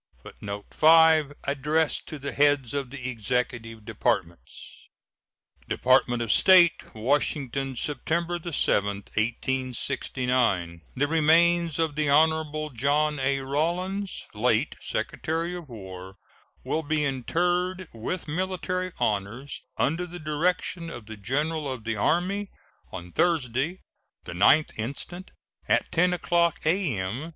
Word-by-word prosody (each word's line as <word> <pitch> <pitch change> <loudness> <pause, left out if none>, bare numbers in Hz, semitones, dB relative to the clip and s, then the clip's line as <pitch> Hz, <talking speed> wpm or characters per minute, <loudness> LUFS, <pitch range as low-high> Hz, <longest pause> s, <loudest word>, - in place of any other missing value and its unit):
[Footnote 100 0 -7
5: 160 -2 +5
Addressed 150 +3 0
to 155 - -6
the 140 0 -5
heads 145 -4 +2
of 140 -3 -2
the 130 -1 -6
Executive 115 -2 -3
Departments.] 105 -6 -3 0.8
DEPARTMENT 125 -2 +3
OF 115 - -1
STATE, 180 -9 +5
Washington, 135 +2 -1
September 170 +6 -2
7, 145 - +1 0.3
1869. 125 -5 -1
The 145 +3 +1
remains 165 +1 +3
of 160 -2 0
the 150 0 0
Hon. 155 0 +2
John 145 +4 +1
A. 135 +1 0
Rawlins, 175 +8 -2
late - - +1
Secretary 165 +3 -2
of 170 -5 -9
War, 95 -4 -9 0.5
will 160 - -1
be 155 -1 0
interred 175 +7 -1
with 120 +12 -4
military 185 +2 -2
honors, 110 +7 -2 0.2
under 170 +5 0
the 175 0 -8
direction 165 +2 -1
of 120 -8 -9
the 110 0 -8
General 145 +7 -1
of 125 -4 -6
the 110 0 -2
Army, 185 - 0 0.4
on 90 0 -8
Thursday, 155 - 0 0.4
the - - -7
9th 140 - +4
instant, 145 - -4 0.4
at - - +1
10 180 +2 +3
o'clock 170 -1 +1
a.m. 145 - -1
145 Hz, 115 wpm, -26 LUFS, 120-165 Hz, 0.8 s, 5